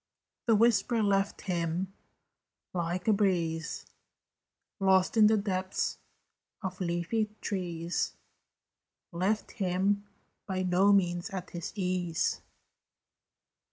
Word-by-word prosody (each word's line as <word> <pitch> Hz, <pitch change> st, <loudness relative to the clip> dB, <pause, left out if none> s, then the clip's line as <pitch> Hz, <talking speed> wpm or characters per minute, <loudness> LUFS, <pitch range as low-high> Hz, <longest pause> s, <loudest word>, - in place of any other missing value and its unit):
The 225 Hz, -, +6 dB
whisper 230 Hz, +1 st, +3 dB
left 195 Hz, -1 st, +1 dB
him 175 Hz, +1 st, -2 dB, 0.8 s
like 175 Hz, +1 st, -2 dB
a 215 Hz, -, +6 dB
breeze 170 Hz, -5 st, 0 dB, 0.9 s
Lost 190 Hz, +1 st, +3 dB
in 215 Hz, -2 st, +7 dB
the 220 Hz, 0 st, +4 dB
depths 190 Hz, -2 st, -1 dB, 0.6 s
of 190 Hz, +1 st, -4 dB
leafy 180 Hz, +5 st, 0 dB
trees 175 Hz, -3 st, -2 dB, 1.0 s
Left 190 Hz, +5 st, 0 dB
him 195 Hz, +2 st, 0 dB, 0.4 s
by 185 Hz, -1 st, -1 dB
no 185 Hz, +3 st, +4 dB
means 175 Hz, -3 st, +2 dB
at 185 Hz, -2 st, -6 dB
his 175 Hz, -2 st, -5 dB
ease. 180 Hz, -4 st, 0 dB
185 Hz, 95 wpm, -30 LUFS, 175-200 Hz, 1.0 s, in